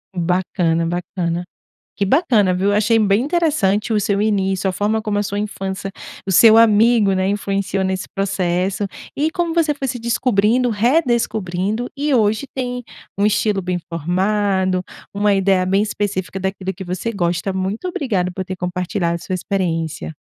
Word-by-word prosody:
Bacana, 175 -1 0
bacana. 175 0 -2 0.5
Que 200 - +1
bacana, 215 - +3
viu. 190 +3 +1
Achei 215 +2 +3
bem 205 0 +3
interessante 285 - +1
o 215 - +2
seu 200 0 0
início, 195 -2 +1
a - - 0
forma 210 +3 0
como 210 -2 -2
a - - 0
sua 205 0 -3
infância 195 -2 -4 0.3
o 190 - -2
seu 220 +4 +7
amigo, 225 -2 +5
né, 190 0 +1
influenciou 195 -1 -1
nesse 190 0 -2
processo 195 0 0 0.3
e 300 +3 +1
como 340 -1 -2
você 325 -3 +2
foi 275 -2 -4
se 245 0 -3
descobrindo, 235 +1 +2
redescobrindo 225 - 0
e, 290 +1 0
hoje 220 +1 +2
tem 250 -1 -3 0.3
um 200 - +2
estilo 210 -1 +1
bem 180 0 -2
formado, 185 +2 0 0.3
uma 205 0 +2
ideia 190 -1 +2
bem 195 +2 +2
específica 200 -3 -3
daquilo 190 0 -3
que 190 - -8
você 180 +5 -3
gosta. 175 -2 -1
Muito 190 - -3
obrigado 205 - -1
por 190 +1 -5
ter 185 - -5
compartilhado 180 0 -2
a - - -2
sua 185 +2 -4
experiência. 165 -4 -2
200 Hz, 160 wpm, -19 LUFS, 185-220 Hz, 0.5 s, seu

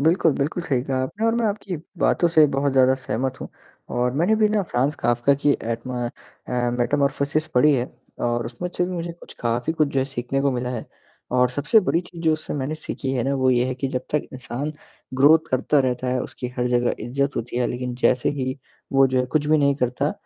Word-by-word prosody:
बिल्कुल, 165 +1 +3
बिल्कुल 150 +6 -2
सही 130 -6 0
कहा 130 -1 -1
आपने 205 +12 -3
और 225 - +2
मैं 235 -1 +1
आपकी 200 -3 -3 0.2
बातों 175 - +3
से 155 -2 +6
बहुत 140 0 +1
ज़्यादा 130 0 +5
सहमत 130 0 -3
हूँ। - - -6 0.4
और 125 +1 0
मैंने 180 +8 +3
भी 215 -1 +4
ना 210 -1 +1
फ्रांज 140 -2 0
काफ्का 120 +3 +2
की 145 +1 +1
एडमा 120 +2 -3
अ, 120 0 -4
मेटामॉर्फोसिस 140 +4 +1
पढ़ी 150 +5 +5
है 125 0 -1 0.3
और 120 0 0
उसमें 130 +9 -5
अच्छे 180 - -1
मुझे 170 -2 -4
कुछ 170 - -14
काफ़ी 120 +5 0
कुछ 155 -3 +1
जो 140 - -1
है 130 - +2
सीखने 135 0 -3
को 140 - +2
मिला 125 0 -2
है। 120 -3 -5 0.4
और 125 0 +3
सबसे 145 - +3
बड़ी 175 -3 +1
चीज़ 170 -1 -11
जो 160 -1 +4
उससे 155 0 -4
मैंने 140 +2 -2
सीखी 140 -3 -5
है 125 - 0
ना 140 +1 0
वो 130 -1 +2
ये 125 -1 +3
है 130 - -2
कि 135 +1 -3
जब 130 -1 -2
तक 150 - +2
इंसान 130 +3 -4 0.4
ग्रोथ 145 +5 +7
करता 130 +3 +2
रहता 125 -1 -1
है 125 0 0
उसकी 125 - -6
हर 125 - 0
जगह 120 0 +2
इज़्ज़त 140 +3 -1
होती 120 +1 -4
है 125 - +2
लेकिन 125 0 -3
जैसे 130 -1 +3
ही 130 +1 -2 0.4
वो 135 0 +6
जो 130 0 0
है 125 - -1
कुछ 150 +2 0
भी 155 0 +4
नहीं 140 -1 +3
करता, 130 +2 0
135 Hz, 225 wpm, -23 LUFS, 125-155 Hz, 0.4 s, ग्रोथ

